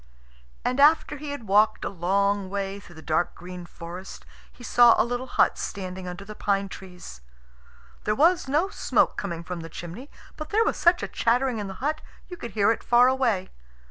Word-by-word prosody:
And 255 +2 0
after 300 0 +4
he 295 +1 -7
had 285 -6 -6
walked 210 +2 +3
a - - -1
long 200 +2 0
way 200 0 -3
through 175 -4 -15
the 160 - -12
dark 160 +2 0
green 180 0 -9
forest, 175 +3 -9 0.3
he 245 - -15
saw 240 0 +6
a - - +4
little 245 +2 -3
hut - - +2
standing 185 -1 -5
under 180 +3 -7
the 215 - -8
pine 200 -1 -1
trees. 180 - -11 0.8
There 210 - +1
was 335 +4 +3
no 305 +8 +1
smoke - - +1
coming 170 -4 -4
from 180 0 -6
the 165 0 -8
chimney, 175 - -9 0.3
but 305 0 -6
there 445 +2 +3
was - - 0
such 345 +1 +3
a - - -1
chattering 245 0 +1
in 205 - -4
the 190 - -7
hut 310 +1 -1 0.3
you 355 - -6
could 235 - -8
hear 205 0 +3
it 230 - -3
far 245 +1 +5
away. 240 -8 0
205 Hz, 200 wpm, -25 LUFS, 185-260 Hz, 0.8 s, saw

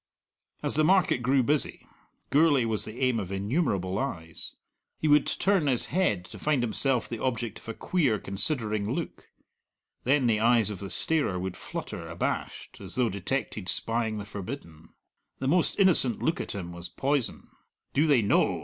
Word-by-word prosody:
As - - -1
the 155 - +2
market 180 -5 +3
grew 130 +2 +3
busy, 145 +4 -1 0.5
Gourlay 145 -4 +4
was 110 -2 +1
the 110 +3 -8
aim 130 -3 +2
of 95 -3 -5
innumerable 100 - -1
eyes. 85 - -5 0.4
He 155 - -1
would 150 0 +5
turn 190 -5 +1
his 125 -4 +4
head 105 - +1
to - - -11
find 150 -5 +1
himself 120 +1 +2
the 115 - -5
object 120 -3 -2
of - - -12
a 115 - -4
queer, 145 -12 +1
considering 105 0 0
look; - - -6 0.7
then 135 +1 +2
the 110 -3 +2
eyes 115 -2 +3
of 100 - -6
the 100 -1 -6
starer 120 - 0
would 95 0 -4
flutter - - -6
abashed, - - -4
as - - -5
though 125 -2 +2
detected 100 -1 -3
spying 115 +1 0
the 100 - -5
forbidden. 100 - -8 0.5
The 130 - -3
most 170 +4 +2
innocent 165 - +4
look 165 - 0
at - - -5
him 90 -3 -5
was 85 0 -8
poison. 135 -3 -2 0.4
"Do 150 +4 +3
they 135 -7 +4
know?" 95 -3 +2
120 Hz, 170 wpm, -28 LUFS, 100-140 Hz, 0.7 s, would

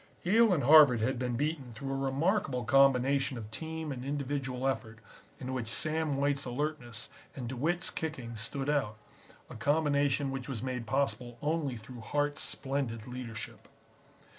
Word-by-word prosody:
Yale 220 +4 +5
and 165 -6 +2
Harvard 145 -3 +8
had 125 +3 0
been 125 -1 -1
beaten 140 -2 -2
through 135 +2 -4
a - - -1
remarkable 135 - 0
combination 135 +1 +4
of 110 -2 -8
team 160 +4 -4
and 125 -2 -5
individual 135 -2 -2
effort 115 -4 -2 0.4
in 130 0 -4
which 125 -4 -2
Sam 155 +4 0
White's 140 0 +1
alertness 125 -3 -3 0.3
and 125 -3 -5
DeWitt's 160 +9 -1
kicking 135 -8 -4
stood 135 +6 -3
out; 135 -8 0 0.5
a - - -10
combination 145 +1 +1
which 135 -1 -5
was 125 -4 -4
made 125 -3 -3
possible 125 -1 -1
only 150 -2 -1
through 115 +2 -10
Hart's 145 +5 -1
splendid 135 -5 -2
leadership. 120 -3 -7
135 Hz, 150 wpm, -31 LUFS, 125-145 Hz, 0.5 s, Harvard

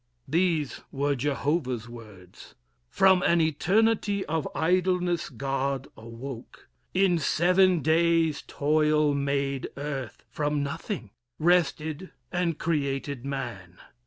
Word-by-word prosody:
These 160 -1 0
were 140 +1 0
Jehovah's 135 -2 -1
words: 105 -6 -13 0.3
"From 190 -1 +4
an 170 -1 +3
eternity 200 +6 +2
of 160 -1 -2
idleness, 180 0 +1
God, 135 0 -2
awoke: 115 +2 -9 0.2
in 185 -2 +3
seven 180 +3 +3
days 165 -1 +2
toil 150 0 +2
made 140 -1 -1
earth 140 -4 -5
From 145 +1 -1
nothing; 140 - -5 0.3
rested, 165 0 +1 0.2
and 175 -3 0
created 140 -4 -2
man. 120 -11 -5
150 Hz, 100 wpm, -27 LUFS, 135-170 Hz, 0.3 s, From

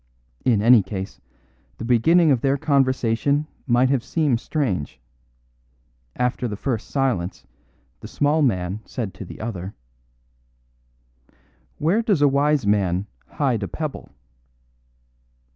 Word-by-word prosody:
In 110 -5 +2
any 120 -1 +7
case, 95 0 -6 0.6
the 115 - -6
beginning 155 +8 +4
of 125 -4 +2
their 135 0 +2
conversation 140 -1 +1 0.2
might 125 +1 +3
have 130 -4 +1
seemed 145 -8 0
strange. 100 - -2 1.2
After 125 0 -1
the 105 - -4
first 115 +1 -3
silence 125 -11 -1 0.5
the - - -9
small 150 +2 +1
man 95 -7 0
said 110 -7 -5
to 95 +2 -9
the - - -11
other: 100 -4 -5 2.0
"Where 175 +9 +2
does 205 - +1
a - - +7
wise 140 -1 +2
man 100 -2 +1 0.2
hide 130 -7 -1
a 100 - -2
pebble?" 155 +4 -5
125 Hz, 120 wpm, -22 LUFS, 105-145 Hz, 2.0 s, any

